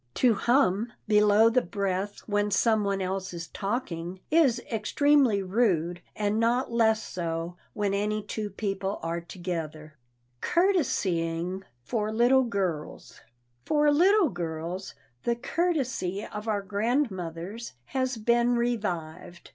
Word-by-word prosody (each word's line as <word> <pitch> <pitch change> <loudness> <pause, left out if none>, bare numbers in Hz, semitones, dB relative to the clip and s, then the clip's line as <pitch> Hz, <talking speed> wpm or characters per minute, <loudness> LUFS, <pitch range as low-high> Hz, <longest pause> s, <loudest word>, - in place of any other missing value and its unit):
To 245 -3 +4
hum 235 -1 +2 0.2
below 210 +1 +5
the 255 +2 +3
breath 195 +1 -3
when 205 -1 0
some 220 +2 +3
one 195 -1 0
else 190 -1 -3
is 165 -1 -6
talking 190 -5 -4
is 290 -7 +4
extremely 240 -1 +3
rude, 180 -4 +1
and 210 +1 0
not 235 +3 +1
less 220 -2 +3
so 170 0 -4 0.2
when 205 -2 -1
any 210 +1 -1
two 210 0 -4
people 195 0 -3
are 165 +1 -2
together. 165 -4 -6 0.5
[Sidenote: - - -3 0.2
COURTESYING 180 - -1 0.2
FOR 215 - -2
LITTLE 245 +4 +4
GIRLS] 185 -9 -4 0.4
For 295 - +3
little 365 +3 +5
girls, 175 0 -5 0.3
the 235 - 0
courtesy 260 - -1
of 210 +1 -7
our 205 -2 0
grandmothers 200 - -2 0.2
has 260 -2 0
been 235 +2 +2
revived. 180 -9 -3
205 Hz, 125 wpm, -27 LUFS, 180-235 Hz, 0.5 s, below